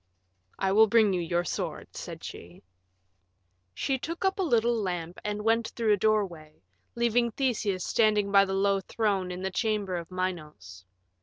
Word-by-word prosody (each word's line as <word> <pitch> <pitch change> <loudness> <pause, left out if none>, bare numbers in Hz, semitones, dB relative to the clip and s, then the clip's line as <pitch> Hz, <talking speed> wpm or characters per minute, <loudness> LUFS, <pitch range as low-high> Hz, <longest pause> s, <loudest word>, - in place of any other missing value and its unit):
"I 190 -1 0
will 220 +3 +6
bring 215 -2 +4
you 180 - 0
your 170 +1 0
sword," 175 - -5
said - - -8
she. 85 +1 -10 1.1
She 265 - -1
took 335 +7 -4
up 385 +1 +1
a - - +2
little 240 -8 +2
lamp 180 -5 -3
and 210 0 -3
went 225 +1 +2
through 225 -3 +2
a - - +2
doorway, 185 - -1 0.3
leaving 235 0 +2
Theseus 215 -7 -1
standing 210 -3 +2
by 200 0 +6
the 195 0 -3
low 195 0 +2
throne 195 -1 -1
in 180 +1 -6
the 190 - -2
chamber 205 -3 -1
of 170 -1 -7
Minos. 155 - -5
200 Hz, 165 wpm, -28 LUFS, 180-225 Hz, 1.1 s, will